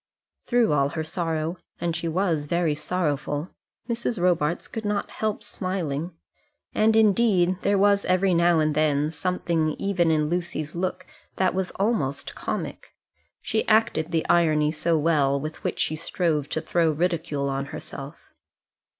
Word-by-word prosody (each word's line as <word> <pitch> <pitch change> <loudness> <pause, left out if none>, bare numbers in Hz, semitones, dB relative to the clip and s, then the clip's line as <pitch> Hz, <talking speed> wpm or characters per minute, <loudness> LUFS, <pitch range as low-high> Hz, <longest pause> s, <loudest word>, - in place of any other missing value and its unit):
Through 240 -8 +3
all 140 -1 +2
her 160 - 0
sorrow, 160 0 -2 0.2
and 170 -1 -1
she 165 +1 -3
was 165 -3 0
very 170 -1 +1
sorrowful, 150 -1 -2 0.4
Mrs. 235 -2 -2
Robarts 175 -2 +1
could 225 - -6
not 205 -1 -2
help 215 -1 -2
smiling. 180 -5 -3 0.6
And, 220 +1 +3
indeed, 200 -4 +4
there 200 0 +2
was 200 0 +4
every 185 +1 +2
now 170 0 +4
and 155 -1 +2
then 150 0 +1
something 165 -2 -1
even 180 -4 +1
in 155 -1 +2
Lucy's 170 -3 -3
look 185 +1 -3 0.3
that 190 -1 +2
was 185 -1 -1
almost 155 - -1
comic. - - -5 0.5
She 220 - 0
acted 215 -7 +2
the 165 -2 -1
irony 155 -3 +3
so 165 +1 +1
well 145 -3 +2
with 155 +2 -6
which - - -2
she 155 - 0
strove 160 -2 -1
to 160 - -2
throw 165 0 +2
ridicule 160 -3 -1
on 135 0 -2
herself! - - -9
170 Hz, 150 wpm, -25 LUFS, 155-185 Hz, 0.6 s, indeed